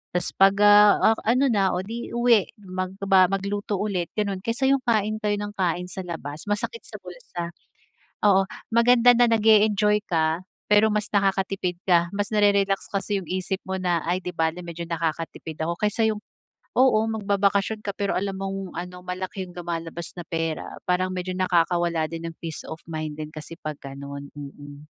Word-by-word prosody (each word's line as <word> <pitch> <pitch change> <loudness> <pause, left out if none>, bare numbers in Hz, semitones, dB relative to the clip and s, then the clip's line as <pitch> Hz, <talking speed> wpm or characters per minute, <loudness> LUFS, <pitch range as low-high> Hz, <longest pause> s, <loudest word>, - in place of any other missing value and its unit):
tapos 180 0 0
'pag, 195 +1 +6
ah, 205 +1 +7
ah, 225 - -1
ano 255 +4 +4
na 195 -4 +2
o 180 - -2
'di 230 +4 -6
uwi, 235 -4 +4 0.2
magba 185 0 +2
magluto 200 +2 -2
ulit, 185 -5 -1
gano'n. 200 -3 -1
Kaysa 235 +7 0
yung 275 -1 +3
kain 215 -2 +1
kayo 210 -1 0
ng 205 0 -4
kain 180 -1 -1
sa 190 -1 -6
labas, 155 -1 -6
masakit 210 - -3
sa - - -10
bulsa. 175 - -7 0.7
Oo. 195 -1 +5 0.3
Maganda 240 +1 +6
na 240 0 +4
nag-e-enjoy 210 -1 +4
ka, 160 0 +1 0.3
pero 210 +1 +6
mas 210 -1 -1
nakakatipid 195 -2 0
ka. 170 -2 +3
Mas 205 +1 -2
nare-relax 200 -1 +2
kasi 200 0 -1
yung 175 - -12
isip 185 +1 -2
mo 190 - -2
na, 175 -3 0
"Ay, 180 +1 +1
'di 180 - -5
bale 165 +2 -1
medyo 170 0 -6
nakakatipid 165 -1 -4
ako." 170 +2 -1
Kaysa 220 +2 +2
yung 215 - -1 0.6
oo, 255 -4 +5
magbabakasyon 200 0 +1
ka 200 - -2
pero 200 -1 0
alam 195 0 -2
mong 195 -2 -5
ano, 180 +1 -6
malaki 185 +1 -4
yung 180 -1 -12
lumalabas 170 -1 -5
na 175 - -6
pera. 165 -1 -4
Parang 185 +1 +1
medyo 185 0 -3
nakakawala 175 -2 +1
din 165 0 -5
ng 165 - -13
peace 165 -2 -6
of 160 +1 -8
mind 155 -2 -5
din 155 0 -6
kasi 155 +2 -9
'pag 155 -1 -5
gano'n, 140 +1 -8
mm. 145 +1 -10
190 Hz, 175 wpm, -24 LUFS, 170-205 Hz, 0.7 s, ah